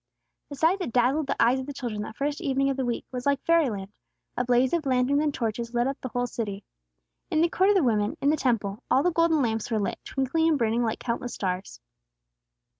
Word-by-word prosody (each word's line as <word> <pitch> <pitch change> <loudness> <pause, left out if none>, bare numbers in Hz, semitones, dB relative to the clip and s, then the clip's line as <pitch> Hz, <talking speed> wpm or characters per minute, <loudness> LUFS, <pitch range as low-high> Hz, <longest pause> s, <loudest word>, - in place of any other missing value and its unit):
The 285 - -6
sight 325 +7 +2
that 360 -10 -3
dazzled 265 +5 +2
the - - -2
eyes 245 +3 +4
of 260 - -6
the 285 - -5
children 235 -6 -4
that 215 - -7
first 290 +3 -2
evening 275 -3 +1
of 270 - -4
the 265 - -1
week, 235 - -2
was 250 +1 -4
like 280 -1 +2
fairyland; 245 -13 +1 0.4
a 245 - 0
blaze 250 +2 +2
of 325 -4 0
lanterns 260 +3 +2
and 305 -1 +1
torches 235 -1 -3
lit 240 0 +2
up 270 +1 -3
the 255 - -5
whole 245 +1 -1
city. 210 -4 -5 0.7
In 320 -4 +1
the 335 +2 +3
Court 380 +4 +2
of 415 - +4
the 375 - +4
Women, 215 -4 +1
in 285 - +3
the - - +3
Temple, 225 -6 -1
all 270 - +4
the 355 - +2
golden 325 -3 +3
lamps 225 -1 -1
were 225 - 0
lit, 205 - -2
twinkling 275 +5 0
and 310 - +3
burning 230 -1 +1
like 225 -2 -1
countless 240 0 -4
stars. 185 0 -3
255 Hz, 235 wpm, -26 LUFS, 230-290 Hz, 0.7 s, eyes